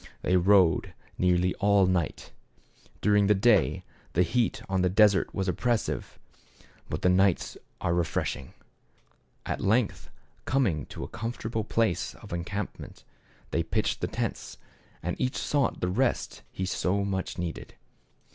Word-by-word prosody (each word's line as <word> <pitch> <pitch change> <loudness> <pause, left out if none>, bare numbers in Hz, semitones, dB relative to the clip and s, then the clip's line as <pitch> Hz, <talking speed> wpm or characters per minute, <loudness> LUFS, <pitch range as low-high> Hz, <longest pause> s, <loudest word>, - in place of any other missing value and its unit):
They 90 - +2
rode 90 -2 +4 0.2
nearly 90 0 +3
all 100 -1 +4
night. 90 -4 -1 0.7
During 105 -1 +4
the 105 - +5
day 105 +1 +3 0.3
the 90 - +4
heat 115 +7 0
on 95 -1 0
the 90 - +3
desert 100 +1 +4
is 95 0 -2
oppressive, 115 +4 -1 0.7
but - - -4
the - - +4
nights 95 0 +2 0.3
are 85 - +1
refreshing. 85 -5 -2 0.9
At - - -3
length, 110 +2 +1 0.4
coming 105 - +1
to - - -7
a - - -5
comfortable 115 0 -4
place 110 -5 0
of - - -10
encampment, 85 +5 -5 0.5
they - - +1
pitched - - -1
the - - 0
tents, - - -4 0.5
and 90 +2 -2
each 130 0 0
sought 140 -4 0
the 90 - +1
rest 120 +8 0
he 95 - -3
so 100 +1 0
much 95 -2 -3
needed. 85 -2 -5
95 Hz, 135 wpm, -28 LUFS, 90-110 Hz, 0.9 s, the